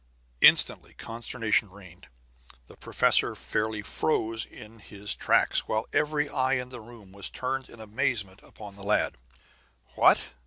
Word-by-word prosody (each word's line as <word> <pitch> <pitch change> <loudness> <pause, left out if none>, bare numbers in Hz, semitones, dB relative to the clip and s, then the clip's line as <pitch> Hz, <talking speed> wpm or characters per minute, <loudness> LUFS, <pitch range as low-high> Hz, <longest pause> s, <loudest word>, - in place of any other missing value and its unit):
Instantly - - +4
consternation 115 -2 -2
reigned. 95 -1 -15 0.6
The - - -16
professor - - +2
fairly 105 -1 -3
froze 110 -1 -1
in 110 +2 -14
his 105 0 -3
tracks, - - +1
while 110 +1 -1
every 150 0 +1
eye 130 -1 0
in 125 -1 -2
the 125 -2 -9
room 110 -4 -15
was 100 0 -1
turned 130 +1 -4
in 115 - -14
amazement 105 -3 -2
upon 105 -2 -12
the 100 - -12
lad. 105 +1 +1 0.8
"What!" - - +4
110 Hz, 140 wpm, -27 LUFS, 100-125 Hz, 0.8 s, Instantly